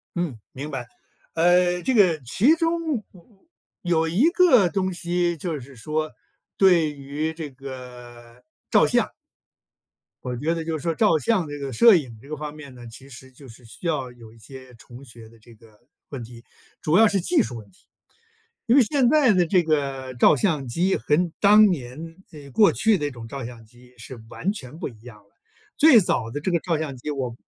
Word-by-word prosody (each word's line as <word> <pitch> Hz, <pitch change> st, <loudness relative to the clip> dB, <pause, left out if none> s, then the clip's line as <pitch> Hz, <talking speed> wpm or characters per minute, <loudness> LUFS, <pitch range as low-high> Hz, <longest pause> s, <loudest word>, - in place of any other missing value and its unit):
嗯， 170 Hz, -9 st, -3 dB
明 140 Hz, +3 st, -7 dB
白。 130 Hz, -4 st, -5 dB, 0.5 s
呃， 180 Hz, +1 st, +3 dB
这 260 Hz, -, -1 dB
个 185 Hz, -8 st, +4 dB
其 230 Hz, -, +3 dB
中， 330 Hz, -7 st, -1 dB, 0.8 s
有 165 Hz, -2 st, 0 dB
一 180 Hz, -, +2 dB
个 315 Hz, -, +5 dB
东 190 Hz, +2 st, -2 dB
西， 175 Hz, 0 st, -1 dB
就 160 Hz, -1 st, -4 dB
是 135 Hz, +1 st, -14 dB
说， 155 Hz, +6 st, -3 dB, 0.5 s
对 175 Hz, -5 st, +4 dB
于 145 Hz, +3 st, -5 dB
这 160 Hz, -2 st, -7 dB
个 125 Hz, -3 st, -12 dB, 0.5 s
照 -, -, +4 dB
相。 -, -, -12 dB, 1.1 s
我 125 Hz, -1 st, -4 dB
觉 155 Hz, +6 st, -1 dB
得 165 Hz, -, -4 dB
就 160 Hz, 0 st, -3 dB
是 145 Hz, -, -11 dB
说 165 Hz, -, 0 dB
照 185 Hz, -2 st, +3 dB
相 190 Hz, -1 st, 0 dB
这 145 Hz, 0 st, -7 dB
个 140 Hz, -2 st, -6 dB
摄 230 Hz, -, +6 dB
影 130 Hz, -9 st, -2 dB
这 140 Hz, -, -16 dB
个 155 Hz, -, -5 dB
方 150 Hz, 0 st, -6 dB
面 145 Hz, -3 st, -12 dB
呢， 120 Hz, -1 st, -12 dB
其 130 Hz, +4 st, -13 dB
实 130 Hz, 0 st, -13 dB
就 135 Hz, +2 st, -16 dB
是 120 Hz, +1 st, -16 dB
需 115 Hz, +9 st, -8 dB
要 140 Hz, -6 st, -2 dB
有 115 Hz, -2 st, -15 dB
一 115 Hz, -, -19 dB
些 130 Hz, +3 st, -13 dB
重 120 Hz, +3 st, -14 dB
学 115 Hz, -3 st, -14 dB
的 115 Hz, 0 st, -20 dB
这 115 Hz, +1 st, -18 dB
个 110 Hz, -1 st, -22 dB, 0.3 s
问 135 Hz, -4 st, -7 dB
题， 115 Hz, 0 st, -13 dB, 0.4 s
主 155 Hz, -, 0 dB
要 225 Hz, +1 st, +6 dB
是 200 Hz, -2 st, 0 dB
技 300 Hz, -, +2 dB
术 125 Hz, -, -4 dB
问 110 Hz, -2 st, -13 dB
题。 185 Hz, -, -27 dB, 0.8 s
因 240 Hz, 0 st, +3 dB
为 280 Hz, -, +7 dB
现 255 Hz, +2 st, +1 dB
在 295 Hz, -5 st, +4 dB
的 180 Hz, -3 st, +3 dB
这 180 Hz, 0 st, +2 dB
个 135 Hz, -4 st, -2 dB
照 120 Hz, -, +5 dB
相 155 Hz, -10 st, -1 dB
机， 175 Hz, +11 st, 0 dB
跟 160 Hz, +8 st, 0 dB
当 210 Hz, +1 st, +6 dB
年 160 Hz, +2 st, -6 dB
哎， 145 Hz, -3 st, -12 dB
过 200 Hz, -, +4 dB
去 220 Hz, -2 st, +2 dB
那 145 Hz, -3 st, -3 dB
种 120 Hz, -4 st, -10 dB
照 135 Hz, -1 st, -6 dB
相 115 Hz, -1 st, -10 dB
机 125 Hz, +2 st, -21 dB
是 115 Hz, +1 st, -11 dB
完 195 Hz, -, -3 dB
全 150 Hz, -, -9 dB
不 -, -, -5 dB
一 110 Hz, -4 st, -18 dB
样 120 Hz, -4 st, -13 dB
了。 100 Hz, -, -29 dB, 0.5 s
最 280 Hz, -7 st, +7 dB
早 120 Hz, -, -1 dB
的 145 Hz, +5 st, -6 dB
这 185 Hz, -, -2 dB
个 170 Hz, -, +1 dB
照 165 Hz, -1 st, -2 dB
相 150 Hz, -4 st, -5 dB
机， 125 Hz, -, -7 dB
我 130 Hz, -4 st, -4 dB
150 Hz, 215 characters per minute, -23 LUFS, 125-180 Hz, 1.1 s, 为